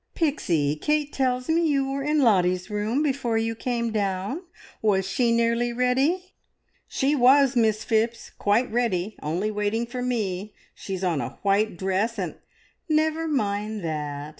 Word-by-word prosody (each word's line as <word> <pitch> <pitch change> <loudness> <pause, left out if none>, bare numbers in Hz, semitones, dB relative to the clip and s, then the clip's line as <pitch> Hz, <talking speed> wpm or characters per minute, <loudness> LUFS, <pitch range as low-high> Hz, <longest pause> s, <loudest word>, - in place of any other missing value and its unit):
"Pixie, 170 - +1
Kate 300 - 0
tells 255 -1 0
me 330 +1 +2
you 275 -3 +1
were 275 0 -2
in 300 +1 +1
Lottie's 185 -3 +2
room 215 +7 0
before 265 -6 0
you 225 0 0
came 235 0 -2
down. 200 - -2 0.4
Was 195 -3 +2
she 235 +4 +1
nearly 235 +1 +2
ready?" 270 +10 0 0.5
"She 280 +3 +1
was, 270 0 +5
Miss 220 -2 +2
Phipps, 230 +1 0
quite 215 +5 +1
ready! 215 -4 0
Only 175 +8 -1
waiting 210 +2 -1
for 250 +1 -6
me. 210 -5 -2 0.2
She's 190 -1 -6
on 170 -6 +1
a - - -6
white 200 -1 +2
dress, 195 +5 -1
and 180 -5 -3 0.3
" - - -41
"Never 315 +1 -1
mind 210 - -1
that. 150 -2 -4
225 Hz, 155 wpm, -25 LUFS, 195-260 Hz, 0.5 s, was